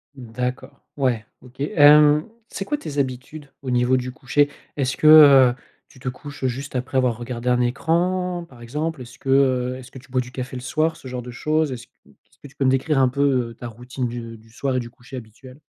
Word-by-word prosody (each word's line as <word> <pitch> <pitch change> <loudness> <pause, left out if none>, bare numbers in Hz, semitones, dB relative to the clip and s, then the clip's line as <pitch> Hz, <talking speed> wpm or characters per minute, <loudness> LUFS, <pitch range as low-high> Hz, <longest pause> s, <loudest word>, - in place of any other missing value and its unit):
D'accord, 125 +2 -5
ouais, 125 -6 0 0.2
OK. 130 +1 -18
Hem, 150 +2 +5 0.2
c'est 195 - -6
quoi 295 - -1
tes 145 - -5
habitudes, 135 +3 -4
au 130 - -3
niveau 125 +1 +3
du 125 0 -4
coucher? 145 +3 +1 0.3
Est-ce 135 -1 0
que, 155 - +1
heu, 140 -5 +8 0.3
tu 130 - -19
te 130 - -8
couches 140 +1 -6
juste 130 +2 -4
après 130 +1 -2
avoir 120 -3 +1
regardé 120 0 -4
un 125 0 +3
écran 175 +7 0
par 125 -5 -16
exemple? 150 +4 -4
Est-ce 120 +1 -11
que 135 - -7
heu, 130 -2 +2
est-ce 125 -1 -12
que 130 - -12
tu 130 0 -15
bois 130 -1 +1
du 125 0 -10
café 130 0 -6
le 125 - -5
soir, 155 +5 0
ce 130 - -11
genre 125 -1 -5
de 125 - -8
chose? 155 +3 0
Est-ce 125 0 -7 0.2
est-ce - - -27
que 145 - -12
tu 140 - -20
peux 135 - 0
me - - +5
décrire 135 +2 +1
un 130 - +5
peu, 140 +2 -3 0.3
heu, - - -11
ta 120 - -10
routine 125 +2 -5
du 115 -1 -7
du 110 +1 -21
soir 130 +2 -2
et - - +2
du 120 -1 -6
coucher 125 +2 -11
habituel? 125 +4 -12
130 Hz, 230 wpm, -22 LUFS, 125-145 Hz, 0.3 s, heu